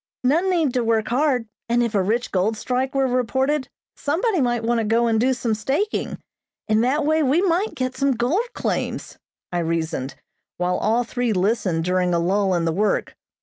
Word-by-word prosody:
None 325 +9 +2
need 325 -8 +1
to 250 - +1
work 225 -1 +1
hard, 255 -2 +1 0.2
and 240 +1 +3
if 235 -2 -2
a 200 - +3
rich 225 +6 -1
gold 200 +4 +1
strike 255 +4 -2
were 270 0 +3
reported, 265 +3 0 0.3
somebody 345 - 0
might 240 -2 0
want 235 +1 +1
to - - 0
go 230 +2 +2
and 225 -1 +2
do 260 +2 +3
some 235 -3 -1
staking. 270 - -1 0.5
In 215 0 +3
that 280 +5 +1
way 315 +1 +2
we 300 +6 +2
might 380 +3 +1
get 255 0 -2
some 275 0 +2
gold 310 - 0
claims," - - -3 0.3
I 175 - -1
reasoned, 160 -5 -2 0.4
while 180 0 0
all 230 +3 +1
three 245 -1 -1
listened 185 -4 0
during 180 -1 +1
a - - +2
lull 190 +2 +1
in 170 -1 0
the 165 - 0
work. 210 +4 0
240 Hz, 190 wpm, -22 LUFS, 210-270 Hz, 0.5 s, and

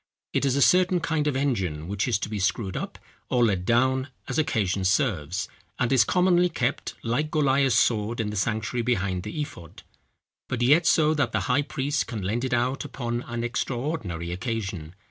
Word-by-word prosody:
It - - +1
is 135 -1 +2
a 140 - +4
certain 180 0 +4
kind 155 -2 -1
of 145 - 0
engine, 95 - -1
which 100 +4 -1
is 120 - +2
to - - -2
be 105 -1 -4
screwed 95 0 -1
up - - -5 0.3
or 125 -2 +3
let 95 -5 0
down 130 +3 +2 0.2
as - - -1
occasion 100 -10 0
serves: 95 - 0 0.3
and 125 +1 +1
is 125 -4 +6
commonly 180 +5 +3
kept 135 -5 -2
like 125 +7 0
Goliah's 140 -5 +2
sword 115 -1 +1
in 105 -2 -1
the - - -5
sanctuary 110 +3 -1
behind 100 -6 0
the 155 - -6
ephod, 130 - -9 0.7
but 120 -1 -1
yet 155 +7 +5
so 155 -1 +4
that 150 -2 0
the - - +1
high 140 +3 +2
priest 145 0 -2
can 110 -5 -5
lend 110 +6 -1
it 130 - -2
out 125 +4 0
upon 120 -4 -3
an 120 0 -3
extraordinary 120 - -3
occasion. 95 -5 -4
120 Hz, 185 wpm, -26 LUFS, 100-140 Hz, 0.7 s, is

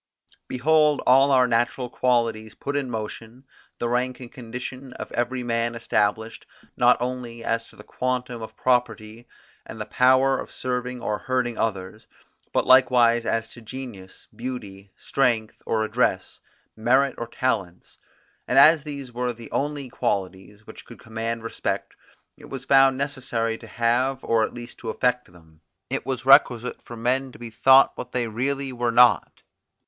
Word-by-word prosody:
Behold 150 +3 +3
all 135 +2 +5
our 130 -2 +4
natural 120 +2 0
qualities 115 -3 0
put 140 - -5
in 140 -3 -1
motion; 115 +2 -7 0.3
the 120 - -2
rank 125 +1 -1
and 125 -2 -10
condition 125 +1 -8
of - - -8
every 125 +1 -2
man 115 0 -1
established, 110 -1 -1 0.3
not 120 0 +4
only 120 -2 -5
as 115 0 -1
to - - -19
the - - -13
quantum 125 -2 -3
of 110 0 -9
property 120 -2 -1 0.4
and 110 - -10
the 105 - -4
power 130 +4 +3
of - - -7
serving 125 0 -4
or 105 -3 -2
hurting 125 -2 -1
others, 100 -1 -4 0.4
but - - +1
likewise 120 -3 +5
as 115 0 0
to 120 - -13
genius, 115 -5 -9
beauty, 105 -6 -7
strength 115 -5 -1
or 110 -1 +1
address, 110 - -1 0.4
merit 130 +5 +2
or 120 - -4
talents; 100 -8 -3 0.5
and 125 - 0
as 155 +3 +7
these 140 -3 -7
were 125 +1 -2
the 115 -1 -12
only 145 -1 -2
qualities 100 -1 -4
which - - -11
could - - -13
command 115 +1 -4
respect, 115 - -3 0.4
it - - -14
was 135 - -7
found 135 -1 +5
necessary 130 -5 -2
to - - -12
have 125 +3 0
or 115 -1 +2
at - - -3
least 120 0 -9
to 115 - -6
affect 125 -2 -1
them. 80 -2 -21 0.3
It - - -3
was 130 -1 -3
requisite 125 -3 +4
for 120 - -10
men 130 +3 -1
to - - -12
be 120 -1 -9
thought 130 +4 +6
what 125 - -8
they 125 -2 0
really 135 +4 -2
were 120 -1 -1
not. 120 0 +4
120 Hz, 160 wpm, -24 LUFS, 115-130 Hz, 0.5 s, as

